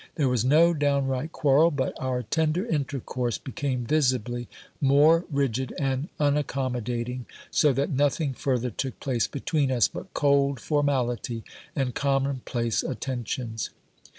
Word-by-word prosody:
There 145 -4 +2
was 125 -3 +1
no 160 +6 +5
downright 140 -1 0
quarrel; 150 +2 +4
but 140 -5 -1
our 125 -1 -1
tender 160 - 0
intercourse 135 - -2
became 130 -2 -3
visibly 125 -4 0 0.3
more 150 +5 +5
rigid 130 -4 -1
and 135 +2 -1
unaccommodating, 125 -4 -1 0.2
so 150 - +4
that 140 +2 0
nothing 145 +1 +1
further 125 -2 -1
took 130 +4 -4
place 125 -4 0
between 140 -1 -1
us 120 -5 +4
but 190 - -9
cold 140 -2 +3
formality 125 -5 0 0.3
and 130 -3 0
common 135 -1 0
place 115 -2 0
attentions. 120 -3 -3
135 Hz, 125 wpm, -26 LUFS, 125-145 Hz, 0.3 s, no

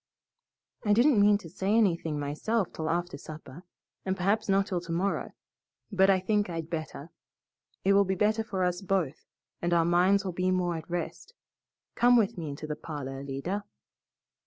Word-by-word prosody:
"I 210 -2 +3
didn't 240 +1 +5
mean 205 0 +5
to 190 - -11
say 195 +3 0
anything 170 -8 +1
myself 170 +9 -1
till 160 0 -3
after 175 -1 -2
supper, 155 0 -10 0.4
and 190 0 -2
perhaps 205 +4 0
not 195 0 +3
till 180 -3 -2
tomorrow, 175 +3 -2 0.6
but 190 -1 +4
I 190 -1 +5
think 205 +1 0
I'd 165 -1 -5
better. 155 -1 -5 0.7
It 195 - +5
will 200 0 +6
be 190 0 -1
better 215 +3 +1
for 195 -4 -2
us 180 +1 0
both, 185 -7 -1 0.3
and 175 0 0
our 165 -1 +3
minds 185 +3 +3
will 185 - -1
be 180 +1 0
more 180 -2 +1
at 160 +1 -7
rest. 175 - -5 0.6
Come 245 +1 +5
with 215 -4 +2
me 165 -4 -5
into 140 +2 -6
the 150 0 -3
parlor, 135 -4 -6
Alida." 140 +9 -4
185 Hz, 175 wpm, -29 LUFS, 165-200 Hz, 0.7 s, will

